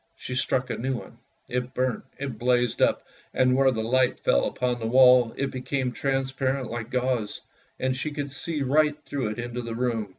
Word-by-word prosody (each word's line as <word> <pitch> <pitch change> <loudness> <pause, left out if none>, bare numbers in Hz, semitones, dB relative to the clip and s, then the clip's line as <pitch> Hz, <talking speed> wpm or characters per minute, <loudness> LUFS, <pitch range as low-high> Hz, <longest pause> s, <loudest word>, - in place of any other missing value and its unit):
She 125 - -7
struck 125 0 0
a - - -3
new 130 +2 -1
one, - - -11 0.3
it 125 0 -3
burnt, 130 -2 0
it 135 -5 -5
blazed 125 -1 +1
up, - - +2 0.3
and 130 -1 +4
where 135 0 +5
the 110 -4 -1
light 130 +2 +2
fell 60 - +2
upon 125 -1 -1
the 115 - -2
wall, 125 -1 +6
it 140 0 -1
became 130 0 -2
transparent 135 -1 -1
like 115 -1 -5
gauze, 125 -4 -1 0.4
and 130 0 0
she 130 +4 -3
could 145 -2 -4
see 150 +1 -3
right 150 +2 +2
through 135 -5 -2
it 105 - -5
into 120 +1 -4
the 115 -1 -5
room. 115 -4 -1
125 Hz, 195 wpm, -26 LUFS, 120-135 Hz, 0.4 s, wall